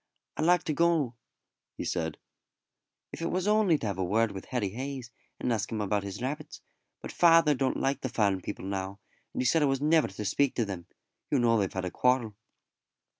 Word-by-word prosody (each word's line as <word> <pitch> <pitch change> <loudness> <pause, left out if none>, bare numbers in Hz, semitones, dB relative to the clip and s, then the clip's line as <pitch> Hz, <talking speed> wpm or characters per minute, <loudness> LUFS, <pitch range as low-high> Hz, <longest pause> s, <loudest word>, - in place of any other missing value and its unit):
"I'd 155 - -1
like 180 -1 +4
to 160 -4 -1
go," 165 -6 +2 0.6
he - - -4
said, 80 -3 -2 0.9
"if - - -8
it 165 - -1
was 185 +2 -1
only 210 -6 +4
to 115 - -6
have 100 -3 -2
a - - +1
word 110 +4 +2
with 95 - -7
Harry 120 -6 -1
Hayes, 130 +2 -6 0.3
and 125 - 0
ask 110 -1 -2
him 110 - -2
about 105 0 0
his 100 +4 -6
rabbits; 150 +4 -4 0.4
but - - -6
father 165 -3 +5
don't 135 -1 0
like 135 +1 0
the 130 - -2
farm 100 -5 +1
people 90 - -6
now, 95 0 -4 0.3
and - - -2
he - - -4
said 160 +6 +3
I - - +4
was 135 -1 +1
never 155 +2 +3
to 100 +2 -7
speak 135 +7 +1
to 115 - +1
them. 95 -4 -6 0.4
You 145 - +2
know 120 -2 +3
they've 95 -2 0
had 95 -1 -3
a 90 - -3
quarrel." 125 -4 +1
125 Hz, 215 wpm, -29 LUFS, 100-150 Hz, 0.9 s, father